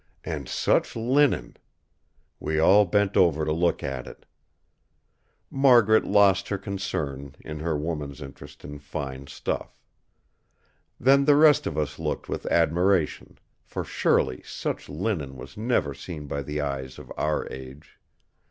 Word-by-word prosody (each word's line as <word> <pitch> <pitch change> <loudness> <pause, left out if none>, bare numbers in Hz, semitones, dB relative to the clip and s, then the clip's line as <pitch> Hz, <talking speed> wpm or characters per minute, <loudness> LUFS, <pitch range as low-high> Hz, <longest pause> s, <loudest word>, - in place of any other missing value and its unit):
And - - -5
such - - +1
linen! 120 - +1 0.8
We 80 - -2
all 100 +6 +6
bent 100 +2 +1
over 80 -4 +3
to 75 - -1
look 85 +2 +1
at 65 -3 -4
it. - - -12 1.3
Margaret 120 -6 +5
lost 100 -2 +3
her 100 - -1
concern, 75 -9 -4
in 75 -1 -7
her 80 -1 -1
woman's 75 -2 -4
interest 70 -3 -11
in 75 0 -8
fine 70 -1 -6
stuff. - - -4 1.2
Then 140 +2 +5
the 145 0 +6
rest 150 0 +5
of 75 - -4
us 75 -2 -2
looked - - -3
with - - -4
admiration; 85 +1 +1 0.3
for - - -5
surely 65 - +1
such - - -5
linen 75 -5 -3
was - - -11
never 105 - 0
seen 75 +2 -8
by 70 0 -3
the 75 +2 -3
eyes 65 -2 -4
of - - -10
our 75 0 -1
age. 65 +3 -11
80 Hz, 140 wpm, -26 LUFS, 70-100 Hz, 1.3 s, all